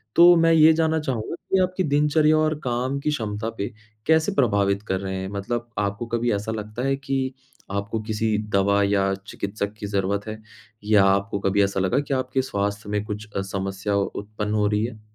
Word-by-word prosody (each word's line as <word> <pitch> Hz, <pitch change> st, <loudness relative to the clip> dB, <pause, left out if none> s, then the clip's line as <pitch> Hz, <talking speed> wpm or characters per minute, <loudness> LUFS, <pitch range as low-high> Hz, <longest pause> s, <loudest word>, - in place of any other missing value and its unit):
तो 175 Hz, +1 st, +8 dB
मैं 165 Hz, 0 st, +4 dB
ये 160 Hz, 0 st, +7 dB
जानना 160 Hz, 0 st, +1 dB
चाहूँगा 130 Hz, -3 st, -3 dB, 0.2 s
कि 190 Hz, -, +4 dB
आपकी 185 Hz, +1 st, -1 dB
दिनचर्या 150 Hz, +1 st, +3 dB
और 155 Hz, 0 st, +2 dB
काम 125 Hz, +2 st, -1 dB
की 145 Hz, -, -1 dB
क्षमता 110 Hz, -6 st, -2 dB
पे 100 Hz, -, -3 dB, 0.4 s
कैसे 160 Hz, +3 st, +3 dB
प्रभावित 100 Hz, -, +2 dB
कर 95 Hz, -, 0 dB
रहे 95 Hz, 0 st, -4 dB
हैं? 95 Hz, 0 st, -4 dB
मतलब 120 Hz, +4 st, -4 dB
आपको 100 Hz, +2 st, -2 dB
कभी 120 Hz, +1 st, 0 dB
ऐसा 105 Hz, +2 st, -2 dB
लगता 110 Hz, +1 st, -5 dB
है 135 Hz, -, +2 dB
कि 135 Hz, -1 st, -2 dB, 0.4 s
आपको 100 Hz, +3 st, -2 dB
किसी 110 Hz, 0 st, -1 dB
दवा 100 Hz, 0 st, +3 dB
या 100 Hz, -1 st, +2 dB
चिकित्सक 100 Hz, 0 st, -4 dB
की -, -, -5 dB
ज़रूरत 100 Hz, +1 st, -1 dB
है? 110 Hz, 0 st, -6 dB, 0.4 s
या 105 Hz, -1 st, +5 dB
आपको 100 Hz, +1 st, +1 dB
कभी 100 Hz, +1 st, +2 dB
ऐसा 100 Hz, 0 st, 0 dB
लगा 95 Hz, +7 st, +2 dB
कि 145 Hz, -1 st, -3 dB
आपके 130 Hz, 0 st, 0 dB
स्वास्थ्य 100 Hz, -4 st, -3 dB
में 105 Hz, 0 st, -1 dB
कुछ 105 Hz, 0 st, -6 dB
अ, 100 Hz, -, 0 dB
समस्या 95 Hz, +1 st, -3 dB
उत्पन्न 105 Hz, +1 st, -3 dB
हो 105 Hz, -1 st, +2 dB
रही 105 Hz, +1 st, +1 dB
है? 115 Hz, -2 st, -7 dB
105 Hz, 195 wpm, -24 LUFS, 100-135 Hz, 0.4 s, तो